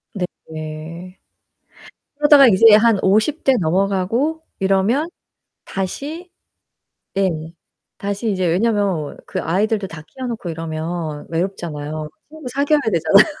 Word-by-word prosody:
네. 165 0 -7 1.0
그러다가 295 -3 +7
이제 220 +1 +7
한 220 -2 +4
50 215 +11 +2
대 270 - +5
넘어가고 195 - 0 0.2
이러면 195 - +1 0.6
다시 290 - -5 0.8
네 195 -1 +2 0.7
다시 200 +3 -2
이제 185 -2 0
왜냐면 195 -4 0
그 - - -3
아이들도 200 +4 0
다 165 -4 -10
키워놓고 240 -8 -5
이러면 160 -1 -4
외롭잖아요. 155 -4 -4 0.2
친구 310 -5 -8
사귀어야 285 +3 +2
되잖아요. 170 +3 +5
195 Hz, 240 characters per minute, -20 LUFS, 165-235 Hz, 1.0 s, 그러다가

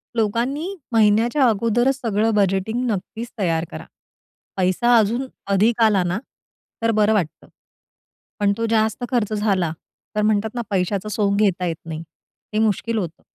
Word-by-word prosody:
लोकांनी 245 - -1 0.2
महिन्याच्या 225 +5 +3
अगोदरच 230 +5 +2
सगळं 220 -1 +1
बजेटिंग 200 +3 +1
नक्कीच 220 +4 -4
तयार 165 -4 0
करा. - - -8 0.7
पैसा 190 +6 +3
अजून 230 +5 +1 0.3
अधिक 220 +4 +3
आला 210 -4 +4
ना 175 +3 -1 0.6
तर 230 0 +2
बरं 210 +1 +4
वाटतं. 180 -8 -2 0.9
पण 200 -1 +3
तो 230 - -1
जास्त 220 +1 +1
खर्च 225 -4 0
झाला, 195 -6 +1 0.4
तर 210 - +1
म्हणतात 215 0 +2
ना 240 - -1
"पैशाचं 195 +1 -1
सोंग 200 -1 +1
घेता 190 -3 +2
येत 170 -2 -1
नाही." 160 -1 -5 0.5
हे 215 - +1
मुश्किल 220 +1 0
होतं. 170 -5 -4
215 Hz, 145 wpm, -21 LUFS, 195-230 Hz, 0.9 s, आला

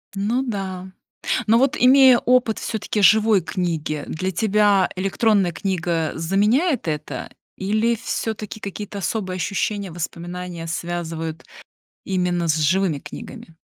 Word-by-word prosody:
Ну 215 +6 0
да. 190 -5 -5 0.6
Но 225 - +5
вот, 265 +2 +2
имея 260 0 +7
опыт 245 -3 +2
всё-таки 215 -1 -2
живой 215 0 +5
книги, 160 -4 -3
для 185 +4 -3
тебя 205 0 +3
электронная 195 0 +2
книга 170 -4 -1
заменяет 210 - +1
это? 150 -1 -4 0.3
Или 215 +4 +1
всё-таки 220 -1 -4
какие-то 205 0 -6
особые 185 +1 -2
ощущения, 195 +1 -2
воспоминания 175 0 -6
связывают 165 -1 -4 0.6
именно 180 -3 0
с 155 - +2
живыми 160 0 +1
книгами? 165 - -10
190 Hz, 115 wpm, -22 LUFS, 170-215 Hz, 0.6 s, имея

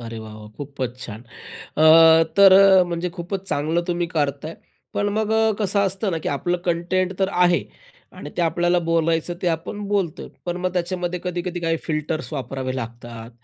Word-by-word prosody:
अरे 115 -1 -7
वाह, 110 -1 -9
वाह! 105 0 -11
खूपच 130 -3 -6
छान. 110 -4 -8
अ, 160 +6 +4
तर 195 -1 +8 0.3
अ, 180 - +3
म्हणजे 175 0 -3
खूपच 190 +2 -6
चांगलं 160 +4 0
तुम्ही 175 0 -1
करताय. 150 -1 -2 0.4
पण 205 0 0
मग 220 0 0 0.3
कसं 200 -1 0
असतं 195 +1 -2
ना 165 - -2
की - - -4
आपलं 175 +5 -1
कंटेंट 180 +2 -1
तर 190 0 +1
आहे. 180 -1 +3 0.5
आणि - - -9
ते 175 - +1
आपल्याला 175 +1 +1
बोलायचं 165 +1 0
ते - - -1
आपण 170 +5 -4
बोलतो. 195 -6 -2 0.2
पण 175 0 -2
मग 180 0 -2
त्याच्यामध्ये 180 0 -2
कधी-कधी 175 0 -3
काही 165 -1 0
फिल्टर्स 155 0 -3
वापरावे 130 -2 -4
लागतात, 115 -1 -8
170 Hz, 170 wpm, -22 LUFS, 145-180 Hz, 0.5 s, तर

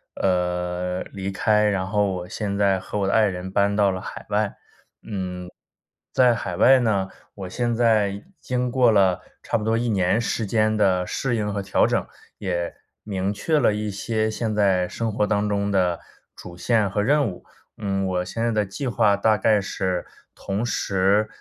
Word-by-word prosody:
呃， 90 0 -1
离 95 0 -4
开， 105 +2 +2
然 95 -3 +1
后 105 0 +1
我 90 0 -6
现 100 -3 -3
在 100 -2 +2
和 95 +3 -6
我 100 - +1
的 100 - +1
爱 110 -1 +5
人 95 -1 -4
搬 100 +1 +2
到 100 -2 +3
了 95 - -4
海 - - -8
外。 105 0 0 0.5
嗯， 90 -3 -5 0.6
在 125 -2 +5
海 90 -6 -4
外 130 +7 +6
呢， 100 -5 0 0.2
我 95 -2 -7
现 120 +2 -1
在 110 -4 +2 0.2
经 125 -1 -2
过 125 -1 +4
了 95 -4 +3 0.2
差 - - 0
不 105 - -4
多 115 0 +2
1 120 +1 -1
年 95 +1 +2
时 115 -1 -1
间 110 +1 +1
的 95 -3 +2
适 125 +4 -2
应 105 -2 -2
和 100 - -2
调 95 - +2
整， - - 0 0.3
也 85 -3 -2 0.3
明 100 -1 -2
确 155 +9 +1
了 120 -6 +3
一 105 0 -3
些 110 +2 -1
现 110 -1 -2
在 95 -3 +2
生 115 +3 -3
活 105 0 0
当 105 0 0
中 100 0 0
的 90 -3 +1 0.4
主 85 - -10
线 110 +2 +1
和 105 +2 -1
任 145 +3 +3
务。 90 - -10 0.3
嗯， 95 -2 -2
我 90 -1 -1
现 95 +5 -5
在 - - +2
的 105 -2 +1
计 115 +8 -5
划 110 -4 +3
大 110 +1 +3
概 105 +1 +3
是 95 -2 -2 0.3
同 100 +3 -3
时， 100 -2 +1
100 Hz, 200 characters per minute, -23 LUFS, 95-110 Hz, 0.6 s, 外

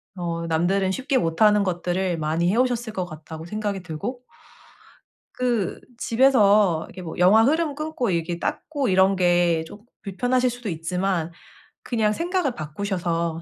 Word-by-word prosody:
어 170 -2 -3
남들은 185 +4 +1
쉽게 265 +6 0
못하는 210 +2 +3
것들을 180 0 -1
많이 160 +2 0
해오셨을 240 0 0
것 185 -3 -2
같다고 160 -1 -9
생각이 205 0 -3
들고. 200 +10 -5 1.1
그 240 -6 -1 0.2
집에서 210 -9 +3
이렇게 185 - -10
뭐 165 -3 -7
영화 200 +5 +6
흐름 305 +3 +1
끊고 305 -5 -2
이렇게 170 -1 -2
닦고 285 - -2
이런 190 +1 +4
게 175 -2 +2
쪼금 205 +6 -13 0.2
불편하실 245 +6 0
수도 245 -2 -6
있지만 175 +1 -2 0.5
그냥 220 -3 0
생각을 340 - -1
바꾸셔서 170 0 -3
190 Hz, 310 characters per minute, -23 LUFS, 170-240 Hz, 1.1 s, 영화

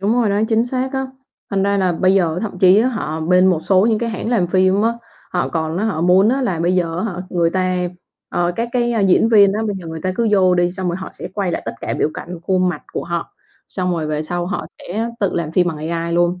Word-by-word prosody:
Đúng 205 +3 +1
rồi 220 - +2
đấy, 205 +2 +1
chính 225 +1 +2
xác 260 +2 -2
á, 265 0 -2 0.4
thành 195 -1 +1
ra 200 0 +1
là 185 -2 +1
bây 185 +3 +2
giờ 170 -3 +1
thậm 200 -4 -5
chí 185 +2 +6
á 250 - +2
họ 160 -10 -3
bên 180 +3 +4
một 175 -4 +2
số 190 +1 +3
những 220 -2 +2
cái 235 -1 -2
hãng 220 +1 -4
làm 210 -8 +2
phim 185 +3 +2
á 230 +1 +2 0.4
họ 175 - 0
còn 160 0 -2
á, 210 - -1
họ 195 -8 -1
muốn 185 +4 +4
á 265 +2 +1
là 180 -9 -1
bây 175 +2 +1
giờ 170 -2 0
á 220 - -1
hả, 175 - -6
người 170 -2 +1
ta, 185 0 0 0.5
ờ, 175 0 0
các 235 +1 -1
cái 240 -1 +1 0.2
diễn 220 +4 +4
viên 200 -3 +6
á 215 - -2
bây 205 - -2
giờ 170 - -10
người 160 0 -6
ta 185 +2 -1
cứ 230 +2 +1
vô 185 -2 +4
đi 175 0 +1
xong 185 -1 -3
rồi 175 - -1
họ 190 - -7
sẽ - - -8
quay 195 -4 -1
lại - - -3
tất - - -4
cả - - -3
biểu 155 - 0
cảnh 175 0 -7
khuôn 185 0 +1
mặt 165 -4 -4
của - - -3
họ, 170 0 -4 0.4
xong 185 -1 -2
rồi 160 -3 -2
về 150 0 -2
sau 175 +2 -3
họ 185 -5 -3
sẽ 225 +6 -3
tự 200 - 0
làm 160 -2 -2
phim 180 0 +3
bằng 160 - -4
AI 170 0 -2
luôn. 175 +1 +1
185 Hz, 280 wpm, -19 LUFS, 175-210 Hz, 0.5 s, chí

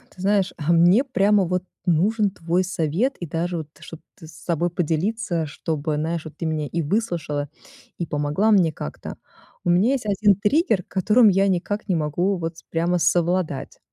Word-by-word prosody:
Ты 180 - -11
знаешь, 200 -1 +1
а 150 +2 -1
мне 175 +9 +5
прямо 205 -6 +2
вот 180 +1 -1 0.2
нужен 200 +6 +2
твой 175 0 -1
совет, 185 - -1
и 175 - -4
даже 170 +3 -2
вот, 155 -3 -5
ты 155 +2 -17
чтобы 165 - -10
ты 160 - -13
с - - -13
собой 170 +1 -2
поделиться, 175 +2 -1
чтобы, 150 +1 -3
знаешь, 160 +2 -2
вот 155 - -10
ты - - -4
меня 155 -2 -2
и 170 +4 -2
выслушала, 160 -5 -2 0.5
и 170 - -2
помогла 150 +9 0
мне 185 -6 +4
как-то. 75 - -7 0.5
У - - -1
меня 185 +8 +4
есть 260 -5 -3
1 205 0 +3
триггер, 210 - +1
которым 215 +5 +4
я 195 +1 +3
никак 195 +3 -2
не 185 - +1
могу 170 +5 0
вот 165 -1 -5
с - - -14
прямо 170 +2 0
совладать. 175 -2 0
175 Hz, 185 wpm, -23 LUFS, 160-200 Hz, 0.5 s, мне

